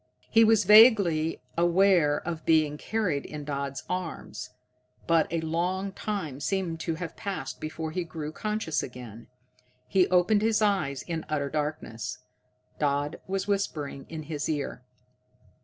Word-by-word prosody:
He 225 -1 +6
was 220 -1 +5
vaguely 200 -7 +6 0.2
aware 175 -3 +4
of 165 -2 -3
being 155 -2 +3
carried 180 -4 -1
in 150 -1 -7
Dodd's 140 -1 -4
arms, 180 -2 -5 0.6
but 165 -2 +3
a 165 -1 0
long 180 +4 -1
time 190 -9 -4
seemed 180 -1 -2
to 165 0 -2
have 165 0 -6
passed 185 -10 -5
before 160 +1 -4
he 180 +2 -2
grew 155 -2 -6
conscious 210 -2 -2
again. 120 -2 -9 0.6
He 190 -2 +3
opened 185 +4 +3
his 220 0 +2
eyes 190 -11 +1
in 165 -2 -4
utter 140 -2 -1
darkness. 150 -7 -3 0.6
Dodd 145 +1 0
was 195 +1 -2
whispering 155 -9 -2
in 160 -1 -6
his 150 0 -4
ear. 145 -5 -3
165 Hz, 140 wpm, -28 LUFS, 150-190 Hz, 0.6 s, He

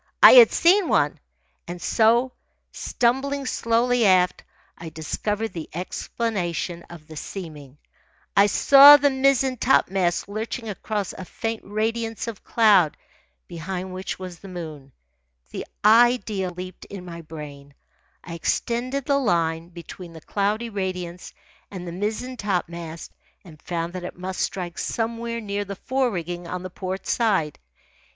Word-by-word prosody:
I - - +12
had 485 -2 +9
seen 365 +1 +4
one. 145 0 +2 0.5
And 175 +1 -6
so, 235 +7 +3 0.4
stumbling 270 +3 -1
slowly 240 0 +1
aft, 185 -3 +3 0.3
I 165 - -8
discovered 210 +8 -3
the 165 -3 -7
explanation 180 -2 -3
of 170 -3 -12
the 160 - -11
seeming. 150 -5 -8 0.6
I 200 +1 +6
saw 280 +7 +9
the 285 0 +2
mizzen 265 -1 +2
topmast 190 -9 +1
lurching 220 +3 -5
across 205 -1 -3
a - - -8
faint 225 +4 -4
radiance 225 +2 -2
of 225 -4 -7
cloud 205 -9 +4 0.5
behind 185 +2 -5
which 185 +1 -5
was 185 -2 -8
the 195 - -12
moon. 155 -7 -8 0.6
The - - -6 0.2
idea 220 -4 +4
leaped 180 +1 -9
in 195 -2 -9
my 170 -1 -8
brain. 145 -3 -10 0.5
I 170 - -8
extended 245 +10 -2
the 280 -1 +2
line 165 -7 0
between 170 0 -10
the 160 - -11
cloudy 210 +6 -1
radiance 180 -3 -5 0.4
and 180 -3 -8
the - - -5
mizzen 215 +7 -4
topmast 170 -5 -4 0.3
and 155 -4 -14
found 170 0 -4
that 185 -1 -6
it 180 - -7
must 185 +1 -4
strike 175 -3 -3
somewhere 230 0 -3
near 205 -2 -3
the 200 0 -7
fore 260 +5 0
rigging 175 -3 -5
on 180 +1 -5
the 185 - -7
port 190 +1 -5
side. 195 -11 0
190 Hz, 140 wpm, -24 LUFS, 175-230 Hz, 0.6 s, I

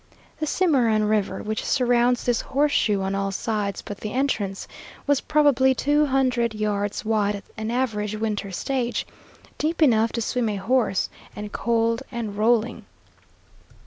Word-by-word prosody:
The 310 - -1
Cimarron 255 - +2
River, 210 -1 0
which 215 +1 -3
surrounds 245 -1 +2
this 240 -2 +1
horseshoe 270 -8 +1
on 190 0 -1
all 195 0 -1
sides 205 -1 -2
but 205 - -7
the 215 - -5
entrance, 220 -8 -1 0.4
was 285 -2 +2
probably 280 -4 +3
two 295 +3 +2
hundred 250 -4 +1
yards 210 +1 -2
wide 210 -2 +1
at 200 - -8
an 220 0 -4
average 220 -4 -1
winter 210 -2 -2
stage, 245 +5 -2 0.5
deep 320 +2 -1
enough 230 -7 +4
to 235 - -1
swim 240 0 0
a 210 - -2
horse, 220 0 +1 0.3
and 210 0 -6
cold 230 0 0
and 230 -4 -4
rolling. 230 +2 +1
230 Hz, 145 wpm, -24 LUFS, 210-260 Hz, 0.5 s, enough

